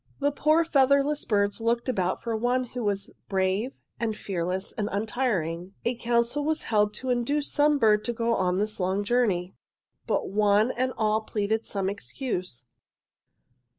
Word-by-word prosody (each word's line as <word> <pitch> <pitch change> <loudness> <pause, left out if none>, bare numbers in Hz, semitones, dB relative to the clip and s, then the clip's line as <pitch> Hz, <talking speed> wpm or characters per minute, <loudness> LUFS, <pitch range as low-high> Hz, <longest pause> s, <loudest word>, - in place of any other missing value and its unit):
"'The 285 0 +2
poor 310 +3 +3
featherless 280 0 +3
birds 205 +1 +1
looked 235 +2 0
about 185 -8 -1
for 230 -1 -1
one 245 +3 +1
who 245 0 -6
was 200 -1 -2 0.2
brave 195 +6 0 0.3
and 225 -2 -1
fearless 185 0 -3
and 210 -3 -2
untiring. 195 -5 -2
A 240 - +2
council 235 +4 0
was 315 +1 0
held 210 -2 +2
to 255 +3 -2
induce 280 +5 0
some 295 0 +3
bird 215 -4 +4
to 240 - -1
go 230 0 0
on 180 -3 +1
this 215 +1 -1
long 190 +2 0
journey. 200 -6 +1 0.5
"'But - - 0
one 210 +3 +3
and 255 +1 -1
all 215 0 +2
pleaded 220 +1 -2
some 195 -2 -2
excuse. 190 - -4
220 Hz, 155 wpm, -27 LUFS, 200-250 Hz, 0.5 s, bird